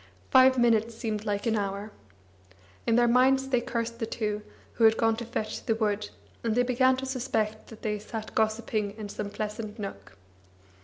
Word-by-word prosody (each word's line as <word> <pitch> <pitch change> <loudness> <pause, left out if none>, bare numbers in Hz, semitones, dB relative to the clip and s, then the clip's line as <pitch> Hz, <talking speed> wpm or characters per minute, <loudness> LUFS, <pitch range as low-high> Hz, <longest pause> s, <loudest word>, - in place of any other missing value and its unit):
Five 260 -1 +7
minutes 230 -1 +3
seemed 220 -2 -3
like 205 0 -1
an 225 -1 +2
hour. 200 +1 -3 1.0
In 230 - +4
their 240 0 +5
minds 265 +2 +4
they 250 -2 +2
cursed 235 -1 -3
the 225 - -2
two, 210 -2 -2 0.3
who 230 - +3
had 220 0 +6
gone 225 -1 +3
to 235 - -4
fetch 220 -2 -4
the 225 - +1
wood, 210 -2 -1 0.3
and 225 -2 0
they 245 - +4
began 255 +1 +3
to 265 - -4
suspect 220 -5 -2
that 225 - -13
they 210 -1 -1
sat 215 +1 -7
gossiping 215 -1 0
in 210 -2 -6
some 205 0 -4
pleasant 215 +1 -5
nook. 145 - -8
225 Hz, 185 wpm, -28 LUFS, 210-240 Hz, 1.0 s, Five